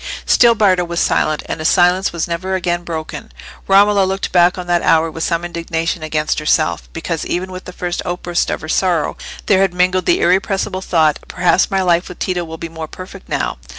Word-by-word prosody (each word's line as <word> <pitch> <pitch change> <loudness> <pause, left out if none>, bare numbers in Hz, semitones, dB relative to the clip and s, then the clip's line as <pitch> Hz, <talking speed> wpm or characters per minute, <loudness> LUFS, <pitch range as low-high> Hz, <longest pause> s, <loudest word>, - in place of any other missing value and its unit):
Still 235 -1 +5
Bardo 185 -5 +3
was 170 0 -3
silent, 155 -1 +1
and - - -5
his 155 - +1
silence 180 +1 +3
was 170 -1 -3
never 185 +3 -2
again 175 -1 -1
broken. 160 -2 -6 0.4
Romola 200 +1 +5
looked 190 +1 -2
back 175 0 +4
on 180 - -5
that 175 -1 +1
hour 160 0 +2
with 160 +1 -5
some 170 0 -1
indignation 165 0 -3
against 155 0 -1
herself, 155 +1 0
because 165 0 -4
even 185 +2 -3
with 185 0 -8
the - - -8
first 175 -1 -4
outburst 175 0 -2
of - - -3
her 160 - -7
sorrow 170 -2 0 0.3
there 190 -2 +3
had 190 -2 +1
mingled 180 0 +1
the - - +3
irrepressible 190 +1 0
thought, 160 -5 +2
"Perhaps 180 +1 +2
my 195 -1 0
life 175 -1 +1
with 180 - -9
Tito 180 -2 -2
will 160 -1 -8
be 165 - -6
more 160 -1 -7
perfect 185 +3 -11
now." - - -2
175 Hz, 205 wpm, -17 LUFS, 165-185 Hz, 0.4 s, Still